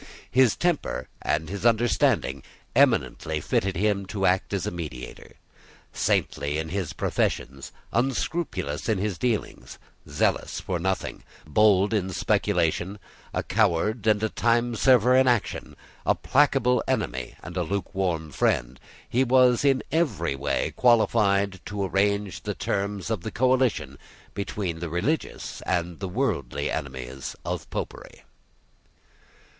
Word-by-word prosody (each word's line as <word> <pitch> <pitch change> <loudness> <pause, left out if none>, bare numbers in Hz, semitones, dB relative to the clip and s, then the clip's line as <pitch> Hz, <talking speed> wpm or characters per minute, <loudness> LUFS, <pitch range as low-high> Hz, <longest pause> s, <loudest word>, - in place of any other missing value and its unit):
His 130 -3 +4
temper 150 - -1
and 75 +1 0
his 100 +4 -5
understanding, 115 - +2 0.3
eminently 80 - +2
fitted 95 +5 0
him 100 +1 0
to 95 -1 -2
act 95 +1 +2
as 100 -3 -1
mediator. 75 -8 -8 0.6
Saintly 70 +1 0
in 80 0 -3
his 95 -1 -2
professions, 65 +1 -2 0.2
unscrupulous 125 - -1
in 110 - +2
his 95 -3 -2
dealings, 115 -1 -2 0.3
zealous - - 0
for 90 -2 -3
nothing, 95 +2 -2 0.2
bold 100 +5 +4
in 95 -3 0
speculation, 95 +1 0 0.3
a - - -2
coward 105 +6 +1
and 105 0 +3
a 110 - +1
timeserver 120 +2 +3
in 130 0 +5
action, 120 -4 0 0.3
a - - +3
placable 130 -4 +3
enemy 65 -2 -2
and 85 +2 -8
a 90 - 0
lukewarm 90 -3 -2
friend, 60 -1 0 0.3
he 125 +3 +2
was 125 -1 +4
in 135 -2 +3
every 110 - 0
way 70 +1 -1
qualified 100 -5 +3
to 100 -1 -3
arrange 100 0 0
the - - -4
terms 100 +1 -2
of 110 -6 -1
the 110 - -4
coalition 120 - +1 0.3
between 100 -4 -3
the 85 0 -4
religious 100 - -2
and 85 -2 -1
the 95 - -4
worldly 90 - -1
enemies 65 -1 -5
of - - -4
Popery. - - -6
100 Hz, 125 wpm, -26 LUFS, 85-120 Hz, 0.6 s, in